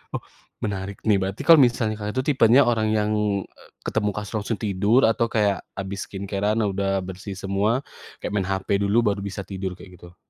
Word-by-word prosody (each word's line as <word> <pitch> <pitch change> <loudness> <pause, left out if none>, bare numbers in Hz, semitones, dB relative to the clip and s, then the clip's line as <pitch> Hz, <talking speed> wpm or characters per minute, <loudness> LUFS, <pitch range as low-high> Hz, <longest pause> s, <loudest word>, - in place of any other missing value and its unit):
Oh, - - -4 0.4
menarik 100 -1 -4
nih. 105 -3 +3
Berarti 95 +8 -3
kalau 165 0 +8
misalnya 115 -4 +2
Kakak 105 +2 -4
itu 130 - 0
tipenya 130 +1 +6
orang 115 -3 +1
yang, 105 0 +1 0.3
e - - -20 0.2
ketemu 105 -2 0
langsung 105 +1 -3
tidur 105 +4 +2
atau 115 +1 +3
kayak 105 -4 +1 0.2
habis 95 0 -5
skincare-an 100 +3 -1
udah 95 -1 0
bersih 95 +2 -7
semua 100 +7 0 0.4
kayak - - -3
main 95 -2 0
HP 95 +1 0
dulu 100 +3 +1
baru 100 -1 +1
bisa 100 0 -5
tidur, 95 -1 -5
kayak 90 -2 -14
gitu? 85 0 -14
100 Hz, 180 wpm, -24 LUFS, 95-110 Hz, 0.4 s, kalau